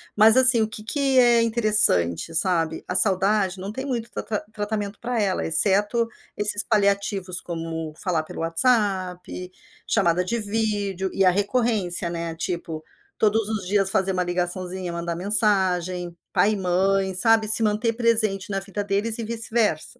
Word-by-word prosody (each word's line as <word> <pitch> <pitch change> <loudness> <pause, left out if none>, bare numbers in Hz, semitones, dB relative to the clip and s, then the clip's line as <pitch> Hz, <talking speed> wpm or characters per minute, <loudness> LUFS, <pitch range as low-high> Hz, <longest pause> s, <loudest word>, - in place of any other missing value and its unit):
Mas 220 +3 +5
assim, 255 -3 +7
o 220 - +1
que 215 -1 -8
que 270 +1 +1
é 240 -1 +4
interessante, 210 - +3
sabe, 165 -2 +1
a - - -4
saudade 190 0 +3
não 190 +2 -6
tem 265 +4 -6
muito 235 -4 -4
trata 210 -2 -4
tratamento 205 -1 -4
para 240 -1 -2
ela, 195 -3 -1
exceto 205 +7 +2 0.3
esses 210 0 +1
paliativos, 200 -3 -1
como 165 -2 -6
falar 175 -5 -2
pelo - - -10
WhatsApp, 185 -1 -1 0.3
chamada 180 -4 +1
de 230 +6 -3
vídeo 205 -3 -2
e 195 - +1
a - - +6
recorrência, 200 -3 -1
né, 170 -1 -5
tipo, 165 -2 -5 0.4
todos 215 0 +1
os 210 -4 -4
dias 195 0 +1
fazer 190 0 0
uma 180 -1 0
ligaçãozinha, 180 +1 -3
mandar 170 0 -4
mensagem, 185 -3 +1 0.2
pai 215 - +2
e - - -3
mãe, 190 +1 0
sabe, 220 +3 +2
se 220 +2 +2
manter 215 +2 0
presente 220 -5 0
na 195 -1 -2
vida 200 +1 -5
deles 205 +3 -2
e - - -3
vice-versa. 225 -2 -2
200 Hz, 155 wpm, -23 LUFS, 180-220 Hz, 0.4 s, assim